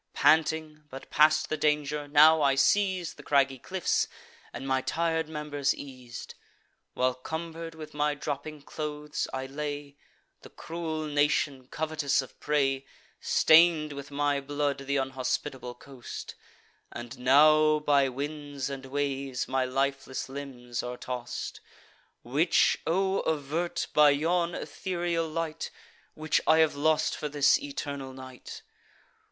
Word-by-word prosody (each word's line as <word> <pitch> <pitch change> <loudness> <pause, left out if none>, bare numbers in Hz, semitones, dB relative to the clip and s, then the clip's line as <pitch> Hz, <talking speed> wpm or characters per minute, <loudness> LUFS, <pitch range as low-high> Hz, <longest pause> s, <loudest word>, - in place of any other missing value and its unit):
Panting, 155 -1 +2
but 135 0 -10
past 155 0 +4
the 155 - -1
danger, 150 -1 0
now 155 +2 +6
I 140 -1 +4
seiz'd 185 +4 +2
The - - -10
craggy 135 -2 +2
cliffs, 185 +6 0 0.4
and 135 - -7
my 130 0 +1
tir'd 160 +3 -1
members 150 -3 -1
eas'd. 125 -4 -9 0.6
While, 130 0 +2
cumber'd 165 +4 -6
with 155 -1 -9
my 150 0 0
dropping 145 +1 -5
clothes, 150 0 -4
I 130 0 -3
lay, 145 0 -5 0.4
The - - -13
cruel 160 -2 -5
nation, 145 -3 +1
covetous 155 -3 0
of 130 - -15
prey, 135 -2 +1 0.4
Stain'd 160 -2 +5
with 140 0 -8
my 145 0 0
blood 145 0 -1
th' - - -10
unhospitable 130 -1 -2
coast; 135 -3 -9 0.6
And 120 +2 -8
now, 155 +4 +6
by 145 -2 +3
winds 145 +1 -5
and 135 -1 -7
waves, 135 -2 -2
my 130 -1 +1
lifeless 135 0 -2
limbs 130 -3 -6
are 125 0 -5
toss'd: 125 0 -5 0.6
Which 150 +8 +3
O 190 +3 +1
avert, 160 +3 -1
by 150 -1 +7
yon 170 +4 +1
ethereal 170 +1 -2
light, 160 0 -3 0.5
Which 155 0 +1
I 160 - +6
have 160 -1 +4
lost 155 +2 +1
for 150 - -4
this 140 -1 +4
eternal 140 - -5
night! 130 -1 -10
145 Hz, 130 wpm, -28 LUFS, 135-155 Hz, 0.6 s, by